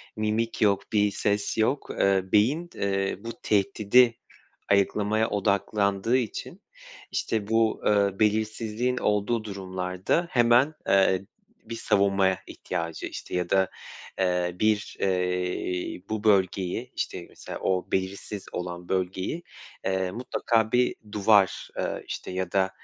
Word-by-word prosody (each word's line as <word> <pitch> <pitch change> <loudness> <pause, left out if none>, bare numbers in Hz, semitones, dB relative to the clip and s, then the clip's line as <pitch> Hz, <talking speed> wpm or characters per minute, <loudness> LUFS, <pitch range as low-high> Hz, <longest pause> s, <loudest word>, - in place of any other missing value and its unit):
mimik 110 +2 -1
yok 100 -2 +4
bir 105 -1 +3
ses 105 +2 -1
yok, 130 +6 +1
ııı, 95 -1 +1
beyin, 140 +12 +3
ııı, 95 0 -1
bu 115 - -5
tehdidi 115 +3 +3 0.5
ayıklamaya 105 +2 +2
odaklandığı 100 +2 +1
için, 130 - -4 0.5
işte, 105 -2 -2
bu, 115 0 +2
ııı, 100 -2 +3
belirsizliğin 110 +3 0
olduğu 105 +2 0
durumlarda 95 - -2
hemen, 120 +5 +4
ııı, 95 0 +3 0.4
bir 115 - -5
savunmaya 100 -3 +2
ihtiyacı, 85 -1 -4
işte, - - -7
ya 90 -1 -1
da, 95 -1 +3 0.5
eee, 90 -1 0
bir, 110 -1 +1
eee, 90 -1 -1
bu 110 0 -3
bölgeyi, 95 -3 +1
işte, - - -3
mesela, - - -8
o 95 -1 -1
belirsiz 95 +1 -3
olan 90 0 -5
bölgeyi, 95 - -2 0.4
eee, 95 -1 0
mutlaka 115 0 0
bir 125 0 +3 0.2
duvar, 100 -2 +3
ııı, - - -2
işte, - - -5
ya 90 -1 -3
da, 95 -1 +2
100 Hz, 120 wpm, -26 LUFS, 95-110 Hz, 0.5 s, yok